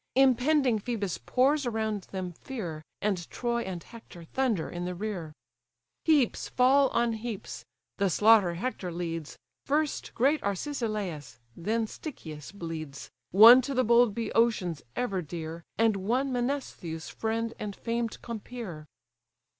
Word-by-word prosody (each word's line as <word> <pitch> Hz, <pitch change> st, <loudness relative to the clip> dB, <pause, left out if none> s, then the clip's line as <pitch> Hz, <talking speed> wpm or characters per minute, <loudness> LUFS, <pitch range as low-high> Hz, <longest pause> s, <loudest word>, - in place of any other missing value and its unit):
Impending 260 Hz, -1 st, +4 dB
Phœbus 205 Hz, -5 st, -3 dB
pours 270 Hz, +2 st, +3 dB
around 220 Hz, -4 st, -2 dB
them 185 Hz, -2 st, -4 dB
fear, 170 Hz, -, -6 dB, 0.2 s
And 190 Hz, -5 st, -1 dB
Troy 235 Hz, -1 st, -1 dB
and 185 Hz, -5 st, -5 dB
Hector 225 Hz, -7 st, -12 dB
thunder 225 Hz, -1 st, 0 dB
in 175 Hz, 0 st, -5 dB
the 180 Hz, 0 st, -3 dB
rear. 180 Hz, -5 st, -4 dB, 0.7 s
Heaps 290 Hz, -7 st, +2 dB
fall 270 Hz, +2 st, +5 dB
on 235 Hz, -1 st, +1 dB
heaps: 220 Hz, -2 st, -6 dB, 0.3 s
the 200 Hz, -1 st, +2 dB
slaughter 205 Hz, -1 st, +5 dB
Hector 185 Hz, -2 st, -3 dB
leads, 165 Hz, -2 st, -4 dB, 0.3 s
First 300 Hz, +1 st, 0 dB
great 280 Hz, +6 st, +3 dB
Arcesilas, 200 Hz, -, -3 dB, 0.2 s
then 220 Hz, +6 st, 0 dB
Stichius 160 Hz, -, -8 dB
bleeds; 160 Hz, -7 st, -7 dB, 0.2 s
One 230 Hz, +7 st, +10 dB
to 275 Hz, +2 st, -4 dB
the 255 Hz, -, +3 dB
bold 235 Hz, -2 st, +4 dB
Bœotians 225 Hz, -8 st, +1 dB
ever 200 Hz, -7 st, -1 dB
dear, 165 Hz, +1 st, -6 dB
And 225 Hz, -2 st, +3 dB
one 245 Hz, +8 st, 0 dB
Menestheus' 245 Hz, -, -3 dB
friend 225 Hz, +1 st, -2 dB
and 205 Hz, -2 st, -4 dB
famed 230 Hz, -1 st, -3 dB
compeer. 220 Hz, -8 st, -7 dB
220 Hz, 130 wpm, -29 LUFS, 175-245 Hz, 0.7 s, One